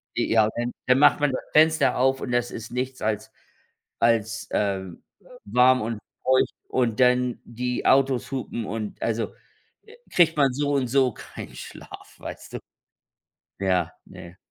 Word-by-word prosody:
Ja, 110 -1 +3
dann 120 +1 -2 0.2
dann 125 +1 +5
macht 145 - +6
man 145 -2 +2
das 130 - -3
Fenster 155 -4 +4
auf 135 +1 +2
und 125 - -4
das 120 0 0
ist 115 +1 -8
nichts 130 +1 -3
als 110 -1 -2 0.7
als, 115 0 +1
ähm, 95 -3 -2 0.4
warm 125 +3 +4
und 110 0 -3 0.2
feucht 130 0 +3 0.2
und 120 -3 0
dann 125 -1 +3
die 125 +1 -4
Autos 135 -1 +3
hupen 120 -4 -4
und 105 0 -5
also 115 0 -1 0.5
äh, 445 +2 -16 0.2
kriegt 165 -3 +4
man 135 -3 +3
so 145 +1 -1
und 135 -3 +1
so 130 -2 +2
kein - - -10
Schlaf, - - -11
weißt - - -9
du? - - -4 1.0
Ja, 90 -3 +1
ne. 85 +1 -12
125 Hz, 155 wpm, -25 LUFS, 110-130 Hz, 1.0 s, macht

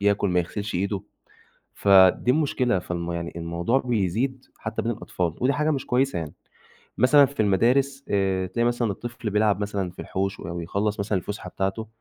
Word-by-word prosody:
ياكل 100 -1 +2
ما 90 0 +2
يغسِلش 100 +4 -5
إيده، 100 +2 -1 0.7
فدي 95 +4 +5
المشكلة، 130 -7 +1
فالم 85 -1 -4
يعني 85 0 -4
الموضوع 85 +9 0
بيزيد 125 +2 -1
حتى - - -4
بين - - 0
الأطفال، 85 -3 -3
ودي 130 +3 +3
حاجة 150 +3 +1
مش 135 -4 -2
كويسة 130 -5 +1
يعني، 80 -3 -5 0.7
مثلًا 140 +4 +6
في 140 -3 -6
المدارس 130 +7 +2
آآ 95 -2 +1
تلاقي 115 +6 0
مثلًا 120 -2 0
الطفل 120 +1 -6
بيلعب 105 0 +2
مثلًا 100 -3 -2
في 90 - -23
الحوش 95 +1 -3
أو 85 0 -5
يخلّص 100 +5 -1
مثلًا 100 -1 0
الفُسحة 100 +4 -6
بتاعته 95 +3 -2
105 Hz, 170 wpm, -25 LUFS, 95-125 Hz, 0.7 s, مثلًا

